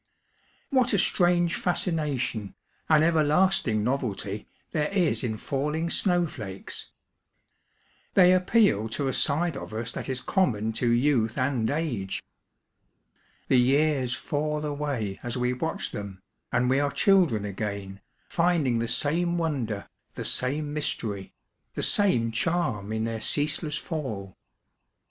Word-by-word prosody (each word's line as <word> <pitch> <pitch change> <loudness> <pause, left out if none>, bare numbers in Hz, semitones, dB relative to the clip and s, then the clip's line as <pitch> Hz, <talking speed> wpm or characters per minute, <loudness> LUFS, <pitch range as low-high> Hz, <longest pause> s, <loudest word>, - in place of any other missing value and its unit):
What 255 -3 +3
a - - +4
strange 175 -1 +3
fascination, 150 - -1 0.3
an 155 -1 +6
everlasting 155 - +3
novelty, 110 -5 -2 0.2
there 150 -1 0
is 180 -7 +1
in 110 -3 -2
falling 150 +7 -2
snowflakes 155 - -2
I - - -47 0.4
They 180 -1 +7
appeal 185 - +3
to 135 +5 -1
a 130 - 0
side 155 +4 +2
of - - -7
us 115 +1 -3
that - - -6
is 130 -1 -1
common 110 - 0
to 120 +2 0
youth 120 -2 +2
and 125 -4 +1
age. 140 -11 -2 1.2
The 130 - +4
years 135 0 +2
fall 150 +1 -2
away 140 -9 -3
as 120 0 -3
we 125 0 +1
watch 160 +6 -3
them, 100 -2 -6 0.3
and 125 - +2
we 135 +2 +3
are 145 0 +1
children 145 - +3
again, 100 -1 -5 0.3
finding 165 -9 +2
the 115 - -1
same 160 +8 +1
wonder, 130 -11 -2 0.3
the - - -5
same 145 +3 -1
mystery, 105 -9 -3 0.4
the - - -2
same 125 - +3
charm 115 - -1
in 110 0 -1
their 115 -1 -3
ceaseless 150 +2 0
fall. 115 - -5
140 Hz, 130 wpm, -27 LUFS, 110-160 Hz, 1.2 s, They